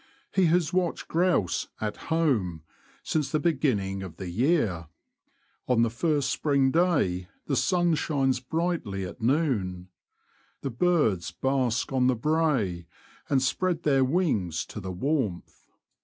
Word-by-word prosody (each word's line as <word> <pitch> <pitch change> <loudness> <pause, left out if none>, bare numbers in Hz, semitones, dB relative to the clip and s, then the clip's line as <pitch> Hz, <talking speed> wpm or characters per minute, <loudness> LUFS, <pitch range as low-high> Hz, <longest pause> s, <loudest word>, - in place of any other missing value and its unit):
He 190 -2 +4
has 170 0 +2
watched 180 -2 -1
grouse 170 - +1
'' - - -37
at 105 - -5
home 115 - +1 0.2
" - - -31
since 150 -3 -1
the 155 - +1
beginning 130 - 0
of 95 -4 -8
the 90 -2 -6
year. 110 - +1 0.8
On 120 -2 +3
the 115 - +1
first 145 +3 0
spring 140 -3 +2
day 145 - +1 0.2
the 140 - -1
sun 175 +3 +2
shines 135 -5 +1
brightly 130 - -2
at 90 +7 -9
noon. 110 - 0 0.7
The 135 - -3
birds 115 - +1
bask 130 +5 -1
on 125 -1 +3
the 130 - +3
brae, 125 - 0 0.4
and 135 -2 +2
spread 175 +5 0
their 135 -3 +3
wings 130 - 0
to - - -5
the 95 -2 -5
warmth. 110 - -2
130 Hz, 140 wpm, -27 LUFS, 95-160 Hz, 0.8 s, He